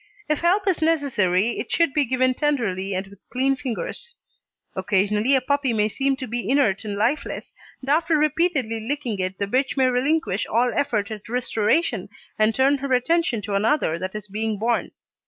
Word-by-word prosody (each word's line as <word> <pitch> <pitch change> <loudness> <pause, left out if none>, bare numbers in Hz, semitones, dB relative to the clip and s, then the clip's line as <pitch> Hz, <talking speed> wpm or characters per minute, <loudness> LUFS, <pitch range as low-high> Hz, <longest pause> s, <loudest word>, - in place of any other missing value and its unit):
If 305 -1 0
help 380 +4 +2
is 370 -4 +1
necessary 240 - +1
it - - -5
should 335 -5 +2
be 295 -1 +2
given 255 +1 +2
tenderly 215 -10 -1
and 190 +1 -2
with 195 0 -16
clean 265 +2 +1
fingers. 290 - -4 0.6
Occasionally 210 +5 +2
a 265 - +2
puppy 280 -1 0
may 210 -1 +1
seem 270 +4 0
to 265 -1 -6
be 235 -1 -3
inert 255 -8 +2
and 205 -2 -4
lifeless, 235 +9 -2 0.3
and 270 - -7
after 320 +1 +3
repeatedly 300 -6 +1
licking 235 -2 -3
it 185 0 -2
the 200 - -1
bitch 260 +7 0
may 260 -1 +4
relinquish 255 - 0
all 240 +3 +1
effort 220 -8 0
at 215 0 -8
restoration 245 +4 0 0.3
and 215 +1 +3
turn 275 +2 +3
her 275 0 -4
attention 250 -3 +1
to 205 - -4
another 200 - +1
that 185 +3 -5
is 210 -1 -6
being 215 +1 -2
born. 230 +3 0
250 Hz, 180 wpm, -23 LUFS, 210-285 Hz, 0.6 s, may